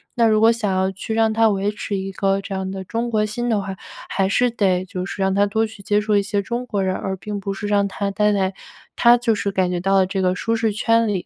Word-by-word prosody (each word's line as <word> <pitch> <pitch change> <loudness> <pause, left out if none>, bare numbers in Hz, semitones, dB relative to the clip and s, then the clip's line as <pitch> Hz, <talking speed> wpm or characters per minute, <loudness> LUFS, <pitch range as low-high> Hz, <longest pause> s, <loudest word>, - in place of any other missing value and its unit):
那 235 -2 +4
如 215 -1 +3
果 225 +1 +6
想 230 -3 -1
要 190 0 +1
去 195 +3 -5
让 225 0 +2
他 225 +1 +3
维 200 0 0
持 210 -1 -4
一 195 0 -3
个 195 +1 0
这 195 - -7
样 190 0 -3
的 190 0 -5
中 235 +4 -2
国 215 -2 +1
心 240 +3 -3
的 220 -4 +1
话， 195 -1 -6 0.3
还 195 -1 +1
是 245 +5 +2
得 190 -5 +1
就 185 0 -5
是 195 - -6
让 190 0 +2
他 200 +1 +3
多 220 +2 0
去 220 -2 -11
接 205 +1 +1
触 210 0 -1
一 - - +3
些 200 0 -1
中 235 +5 -4
国 205 -5 -2
人， 190 0 0
而 190 0 -3
并 205 +2 -5
不 195 0 -4
是 205 +1 -5
让 205 -1 +2
他 200 0 -3
待 210 +1 +2
在 190 -1 0 0.4
他 240 0 +6
就 235 -1 +1
是 205 -1 -2
感 190 -2 0
觉 175 - -1
到 195 +2 +1
了 190 -1 +4
这 190 +1 -2
个 185 0 +1
舒 230 +4 -1
适 225 -2 0
圈 230 +1 +2
里。 195 -4 -2
200 Hz, 305 characters per minute, -21 LUFS, 195-220 Hz, 0.4 s, 果